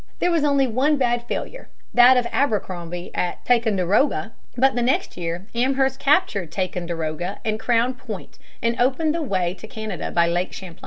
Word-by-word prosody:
There 355 Hz, -, +1 dB
was 330 Hz, -3 st, +2 dB
only 280 Hz, -2 st, +3 dB
one 265 Hz, +5 st, +1 dB
bad 240 Hz, -2 st, 0 dB
failure, -, -, -5 dB, 0.2 s
that 245 Hz, +1 st, +7 dB
of 245 Hz, -, +2 dB
Abercrombie 180 Hz, -9 st, -2 dB
at 180 Hz, -, -3 dB
Ticonderoga. 225 Hz, -, +2 dB, 0.3 s
But 270 Hz, +2 st, +4 dB
the 245 Hz, -, -1 dB
next 250 Hz, +3 st, 0 dB
year 170 Hz, +1 st, -4 dB
Amherst 265 Hz, +2 st, +1 dB
captured 275 Hz, -, +2 dB
Ticonderoga 175 Hz, -1 st, -3 dB
and 215 Hz, 0 st, -1 dB
Crown 240 Hz, +2 st, +2 dB
Point 235 Hz, -6 st, -9 dB, 0.2 s
and 230 Hz, 0 st, +1 dB
opened 290 Hz, +5 st, +2 dB
the 335 Hz, -, -2 dB
way 185 Hz, -, -1 dB
to 200 Hz, +4 st, -11 dB
Canada 215 Hz, -4 st, -5 dB
by 170 Hz, -1 st, +3 dB
Lake 175 Hz, +2 st, -1 dB
Champlain. 180 Hz, -3 st, -9 dB
230 Hz, 165 wpm, -22 LUFS, 180-265 Hz, 0.3 s, that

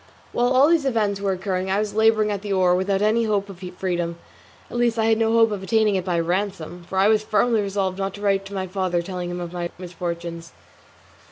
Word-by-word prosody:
While 245 Hz, -, +1 dB
all 265 Hz, +3 st, +6 dB
these 325 Hz, -5 st, +3 dB
events 210 Hz, -5 st, 0 dB
were 200 Hz, -1 st, 0 dB
occurring, 185 Hz, 0 st, -2 dB
I 190 Hz, -, +1 dB
was 210 Hz, 0 st, -1 dB
labouring 220 Hz, -1 st, +3 dB
at 200 Hz, -2 st, -3 dB
the 205 Hz, -1 st, -5 dB
oar 185 Hz, -2 st, +3 dB
without 195 Hz, +2 st, +1 dB
any 225 Hz, +2 st, +2 dB
hope 205 Hz, -2 st, 0 dB
of 190 Hz, -3 st, -10 dB, 0.2 s
freedom; 175 Hz, -2 st, -2 dB, 0.5 s
at -, -, -4 dB
least 240 Hz, -1 st, +1 dB
I 220 Hz, -, +2 dB
had 225 Hz, 0 st, +3 dB
no 225 Hz, 0 st, +2 dB
hope 225 Hz, -1 st, +4 dB
of 205 Hz, -2 st, -3 dB
obtaining 215 Hz, +1 st, +2 dB
it 190 Hz, -2 st, 0 dB
by 175 Hz, -2 st, 0 dB
ransom, 175 Hz, 0 st, -2 dB
for 190 Hz, -, -4 dB
I 195 Hz, +1 st, +5 dB
was 215 Hz, 0 st, +4 dB
firmly 215 Hz, +1 st, +2 dB
resolved 195 Hz, -1 st, -2 dB
not 195 Hz, 0 st, -2 dB
to 205 Hz, -, -10 dB
write 195 Hz, -1 st, +1 dB
to 200 Hz, -, -10 dB
my 190 Hz, -1 st, -2 dB
father 185 Hz, -2 st, -1 dB
telling 180 Hz, -1 st, -5 dB
him 175 Hz, 0 st, -4 dB
of 175 Hz, 0 st, -6 dB
my 175 Hz, -1 st, -3 dB
misfortunes. 170 Hz, -1 st, -6 dB
195 Hz, 235 wpm, -23 LUFS, 180-215 Hz, 0.5 s, all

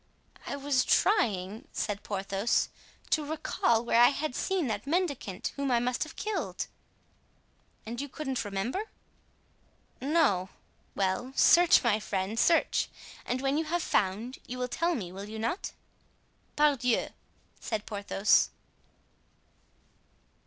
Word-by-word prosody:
"I -, -, -2 dB
was 280 Hz, -2 st, +1 dB
trying," 210 Hz, -, +1 dB
said 205 Hz, -1 st, -2 dB
Porthos, 195 Hz, +2 st, 0 dB, 0.4 s
"to 310 Hz, -, +2 dB
recall 285 Hz, -6 st, 0 dB
where 235 Hz, 0 st, +4 dB
I 240 Hz, -, +9 dB
had 290 Hz, -1 st, -3 dB
seen 380 Hz, -4 st, 0 dB
that 215 Hz, 0 st, -3 dB
mendicant 285 Hz, -, -1 dB
whom 280 Hz, -1 st, -1 dB
I 240 Hz, -2 st, +3 dB
must 245 Hz, +1 st, -1 dB
have 310 Hz, +1 st, -3 dB
killed." 425 Hz, 0 st, -3 dB, 1.2 s
"And 235 Hz, +3 st, -4 dB
you 285 Hz, -, -5 dB
couldn't 270 Hz, -2 st, -3 dB
remember?" 230 Hz, -, -3 dB, 1.1 s
"No." 270 Hz, -, +2 dB, 0.5 s
"Well, 200 Hz, +7 st, -1 dB
search, 345 Hz, -3 st, +6 dB
my 220 Hz, -3 st, +3 dB
friend, 200 Hz, +1 st, -2 dB
search; 330 Hz, +5 st, +3 dB, 0.4 s
and 250 Hz, +1 st, -1 dB
when 275 Hz, +2 st, +1 dB
you 320 Hz, -, -1 dB
have 345 Hz, +2 st, -1 dB
found, 210 Hz, +7 st, 0 dB
you 250 Hz, -, -5 dB
will 250 Hz, 0 st, -1 dB
tell 335 Hz, +7 st, 0 dB
me, 185 Hz, -7 st, -5 dB
will 200 Hz, +2 st, -8 dB
you 220 Hz, -, -6 dB
not?" 230 Hz, -, -2 dB, 0.8 s
"Pardieu!" 275 Hz, -6 st, +2 dB, 0.5 s
said 215 Hz, -2 st, -3 dB
Porthos. 205 Hz, -1 st, +2 dB
245 Hz, 125 wpm, -29 LUFS, 210-295 Hz, 1.2 s, I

